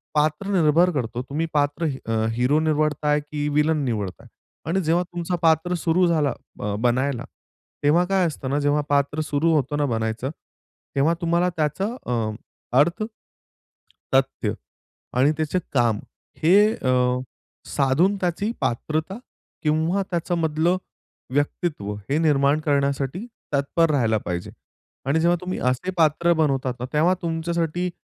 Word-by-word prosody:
पात्र 155 +5 +1
निर्भर 165 +4 +4
करतो. 125 -5 -2
तुम्ही 155 +4 -1
पात्र 145 +3 +1 0.2
अ, 110 -1 0
हिरो 125 +6 +2
निवडताय, 150 -1 +1
की 150 0 -4
व्हिलन 150 +1 +2
निवडताय? 105 -6 -3 0.4
आणि 190 +3 +1
जेव्हा 170 +2 +2
तुमचा 175 0 -3
पात्र 160 +2 +3
सुरू 175 +1 +2
झाला 150 -6 +2 0.3
अ, 105 0 -2
बनायला, 125 +1 0 0.6
तेव्हा 160 +5 +4
काय 190 0 +2
असतं 140 -4 -5
ना, 145 +2 +1
जेव्हा 145 +1 +2
पात्र 145 +2 +1
सुरू 155 +2 +1
होतं 145 0 0
ना 145 - +2
बनायचं, 115 +1 -2 0.7
तेव्हा 145 +5 +3
तुम्हाला 170 +1 +2
त्याचा 155 +5 0 0.2
अ, 115 -3 -1 0.5
अर्थ, 170 +8 +2 1.1
तथ्य - - +1 0.6
आणि 140 +4 +5
त्याचे 155 +4 0
काम 120 -5 +2 0.4
हे 175 +4 +6 0.2
अ, 130 - -1 0.8
साधून 155 +9 +2
त्याची 185 +5 0
पात्रता 155 - -1 0.5
किंवा 160 +5 +1
त्याच्यामधलं 170 0 +1 0.6
व्यक्तित्व 145 - -1 0.2
हे 145 - +2
निर्माण 145 -2 +3
करण्यासाठी 140 - 0 0.3
तत्पर 145 +4 +2
राहायला 115 -6 +2
पाहिजे. 85 0 -4 0.5
आणि 140 +4 +2
जेव्हा 170 +2 +3
तुम्ही 185 0 -3
असे 130 +9 -2
पात्र 165 +2 +3
बनवतात 135 -5 +1
ना, 125 - -3
तेव्हा 165 +5 +4
तुमच्यासाठी 170 +1 -1
150 Hz, 130 wpm, -23 LUFS, 140-170 Hz, 1.1 s, हे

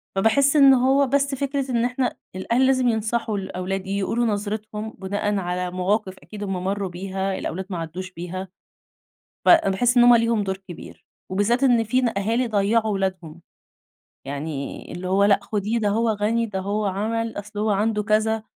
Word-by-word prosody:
فباحِس 270 +9 +3
إنه 265 -3 +6
هو 275 0 +4
بس 275 +1 +1
فكرة 275 -1 -2
إن 235 0 +1
إحنا 250 +1 -1 0.2
الأهل 235 +7 +1
لازم 260 -2 +2
ينصحوا 220 -1 -1
الأولاد، 190 0 -4
يقولوا 200 +4 0
نظرتهم 215 0 -3
بناءً 205 +2 -2
على 180 -1 -2
مواقِف 190 +1 -1
أكيد 210 -1 -9
هُم 190 -2 -3
مَرّوا 195 0 -2
بيها، 190 +2 -3
الأولاد 190 +3 -4
ما 180 - -4
عدّوش 175 +3 -6
بيها، 180 +2 -6 1.0
فباحِس 245 - +4
إن 240 - +7
هُم 245 - +8
ليهم 230 -2 +1
دور 190 0 -2
كبير، 175 - -11 0.3
وبالذات 210 +7 +1
إن 240 -3 +4
فينا 245 +1 +1
أهالي 225 +5 0
ضيّعوا 215 +1 +1
ولادهم، 185 -4 -3 0.9
يعني 140 0 -5
اللي 180 +1 -5
هو 195 +2 +3
لأ 200 -1 +5
خُديه 210 +2 -2
ده 215 -2 0
هو 225 +3 +1
غني، 220 +2 0
ده 200 -3 -4
هو 205 +2 -1
عمَل، 220 +3 -2
أصل 210 +1 -8
هو 215 +1 +1
عنده 210 +1 +1
كذا، 220 +1 +1
210 Hz, 165 wpm, -23 LUFS, 190-230 Hz, 1.0 s, هُم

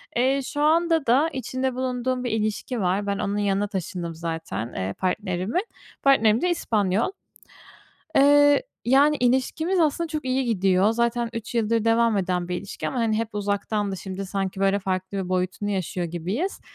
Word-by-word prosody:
Eee, 265 +3 +2
şu 290 +2 -3
anda 325 0 +3
da 260 +7 +4
içinde 260 0 -2
bulunduğum 255 0 -2
bir 245 - -2
ilişki 220 +3 -2
var, 190 +2 0
ben 200 0 -1
onun 205 0 -1
yanına 205 0 +1
taşındım 180 -4 -4
zaten, 160 - -4
eee, 95 +1 -3
partnerimin. 190 - -1 0.4
Partnerim 230 -5 +4
de 360 - +1
İspanyol. 215 - 0 1.1
Eee, 290 - +6 0.2
yani, 280 +5 +4
ilişkimiz 265 +9 +1
aslında 325 +1 +1
çok 305 -2 -4
iyi 260 +1 0
gidiyor 195 -3 +2
zaten 235 0 0
3 230 +1 -6
yıldır 230 -1 +1
devam 230 -1 +3
eden 180 -2 -1
bir 180 - -1
ilişki 195 +3 -5
ama 250 -3 -1
hep 220 0 -2
uzaktandı, 205 0 -1
şimdi 190 +1 -6
sanki, 195 0 -3
böyle, 195 0 +3
farklı 190 0 -3
bir 190 -2 -3
boyutunu 185 +2 -1
yaşıyor 185 -2 -2
gibiyiz. 185 - -3
215 Hz, 160 wpm, -24 LUFS, 190-260 Hz, 1.1 s, Eee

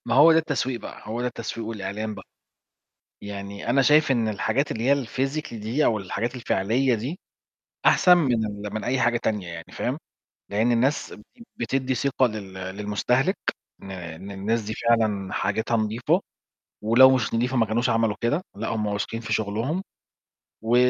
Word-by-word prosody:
ما 115 - +1
هو 155 +4 +8
ده 160 - +5
التسويق 130 -6 -1
بقى، - - -9
هو 110 +3 -4
ده 125 - -1
التسويق 115 -2 -5
والإعلان 105 0 -4
بقى. - - -10 1.0
يعني 100 +2 -6
أنا 135 +2 +4
شايف 150 +1 +5
إن 115 -4 +2
الحاجات 135 +7 0
اللي 115 +2 -4
هي 140 -1 +3
الphysically 135 +1 -2
دي 115 +7 0
أو 110 - +2
الحاجات 110 +6 -3
الفعلية 120 +2 +1
دي، 130 +11 -4 0.7
أحسن 180 -1 +6
من 120 -8 +2
ال-– 105 0 -6
من 110 - -3
أي 130 +1 0
حاجة 120 -1 +3
تانية 105 -5 -1
يعني، 85 -1 -7
فاهم، - - -2 0.5
لإن 110 +4 +2
الناس 130 +5 +1
ب– 105 - -11 0.3
بتدّي 130 +2 -1
ثقة 135 +1 +2
لل 105 -4 -6
للمستهِلك 105 - 0 0.4
إن 95 - -9
إن 90 +1 -7
الناس 105 +4 -1
دي 110 +1 -4
فعلًا 110 -5 +1
حاجتها 110 +3 0
نضيفة، 115 - +1 0.6
ولو 125 +4 +7
مش 115 -3 -1
نضيفة 125 +3 +1
ما 115 - +4
كانوش 120 +4 0
عملوا 115 -2 +2
كده، 145 +9 +1
لأ، 115 +2 -4
هم 110 -2 -1
واثقين 105 +3 -3
في 110 - -3
شغلهم، 115 - -1 0.8
و 115 +2 +2
115 Hz, 170 wpm, -25 LUFS, 105-130 Hz, 1.0 s, هو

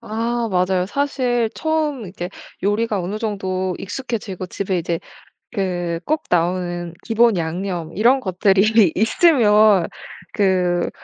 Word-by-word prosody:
아 230 +1 -2
맞아요. 185 0 +1
사실 250 -2 0
처음 310 -5 -1
이렇게 180 -1 -6 0.3
요리가 205 0 0
어느 195 +5 -4
정도 190 -4 -2
익숙해지고 205 -3 -5
집에 190 -1 -2
이제 170 0 -2 0.5
그 175 -5 -2
꼭 310 +1 0
나오는 175 0 0
기본양념 185 -6 0
이런 245 +6 +4
것들이 195 0 +3
있으면 215 - +4 0.4
그 180 -3 +1
200 Hz, 245 characters per minute, -20 LUFS, 180-230 Hz, 0.5 s, 이런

